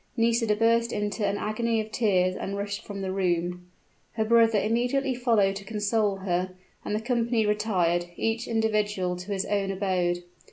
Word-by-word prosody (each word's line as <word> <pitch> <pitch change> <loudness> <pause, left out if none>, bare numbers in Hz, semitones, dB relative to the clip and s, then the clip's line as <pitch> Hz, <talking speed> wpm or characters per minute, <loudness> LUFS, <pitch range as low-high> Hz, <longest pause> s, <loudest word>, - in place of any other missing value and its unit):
Nisida 230 -1 +2
burst 230 +1 +2
into 210 +1 -2
an 200 +1 -1
agony 225 +2 -1
of 215 0 -4
tears 185 -6 +2
and 200 +1 -4
rushed 200 0 -4
from 200 -1 -6
the 190 - -2
room. 180 -1 -1 0.5
Her 220 -1 0
brother 225 -1 +4
immediately 245 +5 +1
followed 225 -6 +2
to 195 - -8
console 210 -1 0
her; 185 0 -1 0.3
and 210 - -2
the - - 0
company 235 -1 +1
retired, 185 -5 +1
each 225 +3 -1
individual 210 -5 0
to 180 +3 -7
his 195 -1 -1
own 200 -1 0
abode. 185 -3 0
210 Hz, 165 wpm, -27 LUFS, 190-225 Hz, 0.5 s, brother